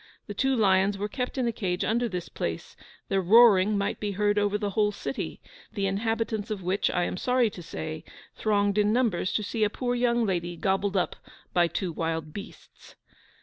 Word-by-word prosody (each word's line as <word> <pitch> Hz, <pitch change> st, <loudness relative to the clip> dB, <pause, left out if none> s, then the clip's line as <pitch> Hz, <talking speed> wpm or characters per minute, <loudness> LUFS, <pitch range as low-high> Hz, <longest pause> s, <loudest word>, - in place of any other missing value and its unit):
The 205 Hz, -, -6 dB
two 265 Hz, +6 st, +1 dB
lions 195 Hz, -2 st, +3 dB
were 205 Hz, +1 st, -2 dB
kept 250 Hz, +5 st, -4 dB
in 255 Hz, -2 st, +1 dB
a -, -, +1 dB
cage 185 Hz, -5 st, -2 dB
under 235 Hz, +2 st, +1 dB
this 180 Hz, -3 st, -4 dB
place; -, -, -5 dB, 0.3 s
their 195 Hz, 0 st, +1 dB
roaring 205 Hz, 0 st, +6 dB
might 200 Hz, -, -1 dB
be 205 Hz, -1 st, -2 dB
heard 205 Hz, +1 st, +2 dB
over 205 Hz, 0 st, +1 dB
the 205 Hz, -1 st, -2 dB
whole 210 Hz, +1 st, +2 dB
city, 255 Hz, -, -5 dB, 0.3 s
the 200 Hz, -3 st, -1 dB
inhabitants 220 Hz, +2 st, -1 dB
of 205 Hz, -4 st, -4 dB
which, 185 Hz, +3 st, +1 dB
I 180 Hz, -, 0 dB
am 180 Hz, -, -2 dB
sorry 250 Hz, 0 st, +2 dB
to 180 Hz, -, -9 dB
say, 155 Hz, -1 st, -6 dB, 0.3 s
thronged 205 Hz, -1 st, +1 dB
in 210 Hz, 0 st, +3 dB
numbers 220 Hz, -6 st, +1 dB
to 215 Hz, -, 0 dB
see 220 Hz, +2 st, -1 dB
a 210 Hz, -, +3 dB
poor 245 Hz, +3 st, -2 dB
young 240 Hz, -1 st, +2 dB
lady 175 Hz, -3 st, -2 dB
gobbled 195 Hz, +2 st, 0 dB
up 180 Hz, -, -1 dB, 0.4 s
by 175 Hz, -1 st, +4 dB
two 180 Hz, +1 st, -3 dB
wild 160 Hz, -1 st, -3 dB
beasts. 200 Hz, -, -11 dB
205 Hz, 195 wpm, -27 LUFS, 185-225 Hz, 0.4 s, roaring